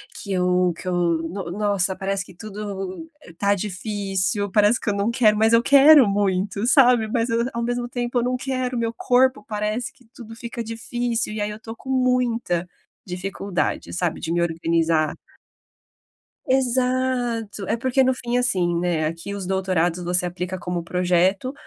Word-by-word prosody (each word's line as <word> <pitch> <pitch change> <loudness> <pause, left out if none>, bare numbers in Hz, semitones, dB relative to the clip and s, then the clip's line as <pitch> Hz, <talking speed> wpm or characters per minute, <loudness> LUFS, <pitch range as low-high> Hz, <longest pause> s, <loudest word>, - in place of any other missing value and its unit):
que 200 -2 -5
eu 180 -1 +2
que - - -11
eu, 185 - -1
no 170 +1 -1
nossa, 200 -1 0
parece 195 0 -2
que 185 - -15
tudo 205 - -6 0.3
tá 200 0 +2
difícil. 200 0 -2
Parece 210 +4 +3
que - - -2
eu - - +1
não 200 +2 0
quero, 220 -4 +3
mas 220 +1 +3
eu 230 - +5
quero 280 -2 +7
muito, 200 +2 0
sabe. 245 -5 +5
Mas 230 +2 -1
eu, 230 +1 +1
ao 235 - -2
mesmo 245 0 -2
tempo 245 0 -2
eu - - 0
não 250 +1 0
quero, 255 -1 -2
meu 230 -1 -1
corpo, 260 +3 +2
parece 215 +2 -3
que 250 - -24
tudo 225 -3 -11
fica 235 0 -6
difícil. 230 0 -2
E 215 - -4
aí 205 - -1
eu 210 - -7
estou 225 +1 -9
com 255 +3 -12
muita 245 -8 +1 0.4
dificuldade, 180 -2 -3
sabe, 175 -2 -1
de - - -5
me 175 - +1
organizar. 165 -2 +1 1.3
Exato. 250 -4 0
É 225 - 0
porque, 260 +2 +2
no 260 0 +3
fim, 245 -1 -2
assim, 185 -9 +1
né, 170 -3 0
aqui 165 +5 -4
os 200 -2 -5
doutorados, 180 -2 0
você 180 +1 0
aplica 180 +1 -4
como 175 -1 -3
projeto, 180 +7 +1
210 Hz, 170 wpm, -22 LUFS, 180-240 Hz, 1.3 s, quero